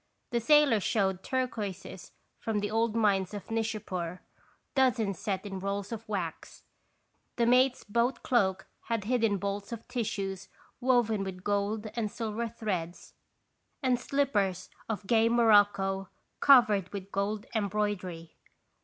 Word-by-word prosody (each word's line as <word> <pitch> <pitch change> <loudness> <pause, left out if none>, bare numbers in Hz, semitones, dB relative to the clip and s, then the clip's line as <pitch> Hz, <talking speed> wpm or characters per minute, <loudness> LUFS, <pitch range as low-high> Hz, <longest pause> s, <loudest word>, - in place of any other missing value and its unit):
The 235 - +1
sailor 295 -2 +5
showed 190 -2 0
turquoises 215 -8 -4 0.3
from 225 -2 -2
the 205 0 -2
old 225 0 +1
mines 200 -3 +2
of 205 +2 -8
Nishapur, 190 -6 -3 0.5
dozens 235 - +2
set 195 -3 -2
in 195 -2 -5
rolls 200 +2 -3
of 225 -1 -7
wax. 180 -6 -5 0.7
The 235 - +2
mate's 255 +2 +4
boat 235 +5 0
cloak 195 -6 +1 0.2
had 230 -3 -1
hidden 225 -2 +1
bolts 200 +2 -4
of 230 -1 -7
tissues 195 -5 -3 0.3
woven 240 -5 +2
with 185 -1 -6
gold 205 +2 -1
and 225 -3 -1
silver 230 0 -3
threads, 190 -7 -4 0.7
and 250 -2 +2
slip 275 +2 0
pers 190 -3 0 0.2
of 210 -2 -3
gay 225 +1 +4
morocco 205 -4 +3 0.3
covered 215 -9 +5
with 200 -1 -7
gold 205 +2 -2
em 210 -3 0
broidery. 185 -5 -3
210 Hz, 135 wpm, -30 LUFS, 195-230 Hz, 0.7 s, sailor